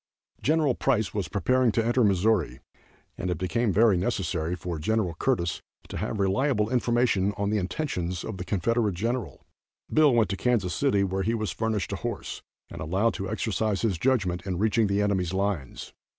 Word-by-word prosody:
Gen. 155 -2 +2
Price 115 -6 +1
was 100 -4 -2
preparing 125 +5 +2
to 115 - +1
enter 120 +1 +3
Missouri, 100 -2 +2 0.6
and 90 - -2
it 90 - -1
became 100 +6 0
very 105 0 +4
necessary 90 -4 -1
for 90 -3 -5
Gen. 100 +1 0
Curtis 85 -11 0 0.3
to - - -5
have 110 - -3
reliable 105 +3 +1
information 120 -5 +2
of 100 0 -1
the 105 - +1
intentions 90 - -3
of 110 - -5
the 90 - -4
Confederate 105 +2 0
General. 115 +5 -3 0.5
Bill 155 -2 +6
went 110 -5 +3
to - - -1
Kansas 105 -8 +1
City, 100 -3 +2
where 95 0 -1
he 115 +4 0
was 110 -6 -2
furnished 110 -1 -2
a - - -2
horse, - - -5 0.3
and - - -7
allowed 95 +8 +1
to 95 0 -4
exercise 110 -1 -1
his 100 -7 0
judgment 100 -9 +1
in 90 -2 -2
reaching 110 +2 +2
the 100 +1 +1
enemy's 95 -3 0
lines. 95 -9 -3
105 Hz, 180 wpm, -27 LUFS, 95-115 Hz, 0.6 s, Bill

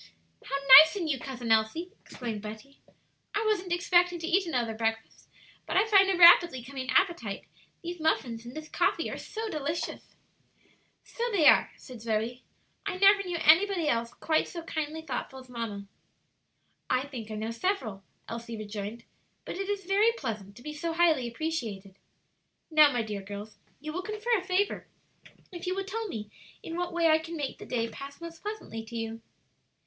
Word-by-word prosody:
"How 275 - -4 0.2
nice 315 +6 +6
in 360 -5 -2
you, 275 -4 -1
Cousin 245 -3 -5
Elsie!" 225 +12 +1
exclaimed 225 -5 -6
Betty. 220 +6 -10 0.6
"I 430 +2 0
wasn't 390 -4 0
expecting 350 0 +3
to 330 - -5
eat 370 +1 +2
another 240 -7 -1
breakfast, 225 0 -3 0.4
but - - 0
I 395 - +5
find 395 -3 +5
a 380 - +1
rapidly 340 -6 +7
coming 260 0 -7
appetite; 260 - +1 0.4
these 345 0 -5
muffins 250 -7 0
and 240 +1 -10
this 310 0 -7
coffee - - 0
are - - -5
so 445 +1 -5
delicious." 310 -3 -4 0.9
"So 470 - -4
they 365 -7 +2
are," - - +6
said 250 -4 -11
Zoe. 230 +2 -2 0.4
"I 385 -2 -3
never 395 +1 +6
knew 355 -3 -3
anybody 355 +1 +4
else 235 -3 0
quite 315 -1 +1
so 340 -2 -7
kindly 315 -1 -4
thoughtful 265 -2 -5
as 255 -1 -12
mamma." 225 -5 -5 1.0
"I 255 0 +2
think 245 -6 -8
I 215 - -5
know 220 +2 -3
several," 230 - -2 0.2
Elsie 230 0 -6
rejoined; 215 +2 -6 0.4
"but - - -5
it 390 0 -3
is 400 -2 -2
very 405 +4 +4
pleasant 215 - -6
to 245 - -14
be 300 +1 -6
so 330 +2 -3
highly 320 -7 +3
appreciated. 230 -8 -4 0.8
Now, 305 -2 +7
my 245 -3 0
dear 210 -2 -5
girls, 205 +2 -8 0.2
you 305 +1 -6
will 365 - -3
confer 430 +4 -1
a 380 - -1
favor 380 +2 -1 0.6
if 350 -1 -7
you 365 - 0
will 390 0 -3
tell 440 +3 -4
me 210 - -6 0.3
in 330 - -6
what 355 0 -2
way 340 -1 +2
I 315 0 +5
can 325 +1 -7
make 285 -3 -4
the - - -10
day 230 -2 -1
pass 275 +4 -9
most 335 -1 -9
pleasantly 415 - -6
to 235 +1 -10
you." 225 0 -5
300 Hz, 180 wpm, -29 LUFS, 230-355 Hz, 1.0 s, rapidly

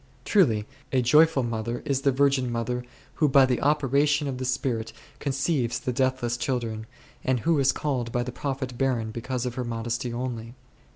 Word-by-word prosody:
Truly 115 - +3 0.3
a 130 -2 +2
joyful 150 +2 +5
mother 115 +1 -3
is 140 -3 0
the 140 - +3
virgin 135 -2 +2
mother 125 +1 -2 0.4
who 150 - +5
by 135 0 +6
the 125 -2 0
operation 145 0 +2
of 130 -2 -4
the 130 - -3
Spirit 120 -3 -1 0.3
conceives 135 -4 0
the 125 - -3
deathless 130 -2 0
children, 115 -5 -2 0.4
and 130 -2 +1
who 165 -2 +2
is 135 -1 +4
called 125 -6 -2
by 120 +1 0
the 125 - -5
.Prophet 130 -1 -4
barren 120 -5 0
because 125 +2 -3
of 125 - -2
her 125 0 -3
modesty 120 +1 -3
only. 120 -1 -5
125 Hz, 175 wpm, -26 LUFS, 120-140 Hz, 0.4 s, by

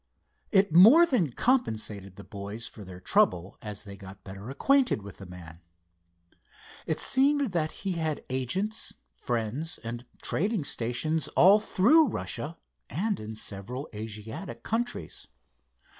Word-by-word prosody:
It 195 -4 +3
more 230 - +9
than 235 - +1
compensated 110 - 0
the 100 - -11
boys 100 +3 -6
for 105 - -11
their 90 -1 -10
trouble 90 0 +1
as 105 -3 -5
they 100 -1 -9
got 95 0 -12
better 100 +4 -9
acquainted 260 - +2
with 100 -1 -10
the 95 - -10
man. 85 -2 -11 1.3
It 160 - -1
seemed 275 -2 +3
that 160 -3 -1
he 195 - 0
had 160 -3 -2
agents, 185 - -2 0.2
friends, 120 +7 -3
and 120 +2 -6 0.2
trading 200 -1 0
stations, 130 +6 0
all 195 +4 +7
through 260 - +4
Russia 160 - -3 0.3
and 200 - -1
in 110 +1 -7
several 110 +7 -4
Asiatic 110 +2 -7
countries. 240 +2 -3
125 Hz, 130 wpm, -28 LUFS, -, 1.3 s, more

